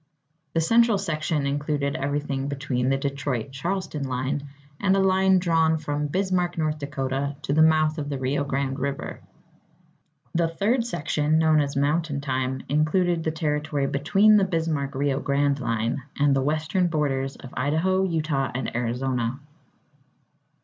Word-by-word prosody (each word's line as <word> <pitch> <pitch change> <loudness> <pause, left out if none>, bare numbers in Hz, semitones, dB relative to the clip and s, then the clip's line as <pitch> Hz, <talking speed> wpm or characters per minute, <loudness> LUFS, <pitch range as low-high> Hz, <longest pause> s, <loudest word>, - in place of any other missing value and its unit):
The 165 - +3
Central 230 +4 +4
Section 155 -5 -1
included 145 0 -1
everything 140 -2 -2
between 135 -3 -1
the 135 - +2
Detroit 135 -3 -3
Charleston 170 +2 -3
line, 135 +3 -2 0.3
and 195 -1 +3
a - - +2
line 190 0 +4
drawn 165 -3 +2
from 150 -1 -2
Bismarck, 180 +1 0
North 155 -1 -1
Dakota, 140 0 -2
to 140 - -1
the 155 - +4
mouth 155 0 +4
of 145 -1 -4
the 140 - -2
Rio 135 +2 0
Grande 140 -1 -2
River. 140 +1 -4 1.1
The 170 0 +2
Third 225 +9 0
Section, 150 -5 0
known 160 -1 +4
as 140 0 -2
"Mountain 145 +1 0
Time," 130 -1 -2
included 165 +4 +1
the 160 - 0
territory 150 -2 -1
between 195 +11 +4
the 200 - +4
Bismarck 160 -6 -1
Rio 140 0 0
Grande 140 0 +1
line 115 +1 -1 0.2
and 145 -1 +4
the 135 - +2
western 155 +5 0
borders 135 -4 -1
of 130 - -12
Idaho, 160 +8 +1
Utah, 155 -7 0
and 130 - -3
Arizona. 125 +1 -1
145 Hz, 150 wpm, -25 LUFS, 135-165 Hz, 1.1 s, Central